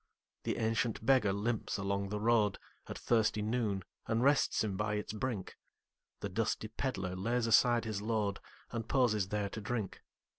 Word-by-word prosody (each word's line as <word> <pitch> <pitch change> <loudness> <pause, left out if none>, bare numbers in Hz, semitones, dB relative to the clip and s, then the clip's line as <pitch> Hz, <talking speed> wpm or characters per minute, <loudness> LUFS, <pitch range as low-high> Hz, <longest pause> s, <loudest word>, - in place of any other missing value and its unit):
The - - 0
ancient 115 0 0
beggar 130 -6 +4
limps 105 +3 -1
along 100 0 -1
the 105 +1 -2
roadAt 110 -2 +3 0.4
thirsty 110 -2 +2
noon, 105 -4 0 0.2
and 115 +1 +1
rests 140 -3 +3
him 105 -3 -2
by 105 +1 -1
its 105 +1 -3
brink; 110 -3 -4 0.6
The 100 - -3
dusty 110 +2 -1
pedlar 95 -7 -3
lays 115 +5 0
aside 120 +1 +4
his 105 -3 -3
load, 105 -2 0 0.3
And 115 -2 -4
pauses 110 -8 +3
there 105 0 -1
to 110 - -6
drink. 110 -2 -3
110 Hz, 155 wpm, -33 LUFS, 100-115 Hz, 0.6 s, beggar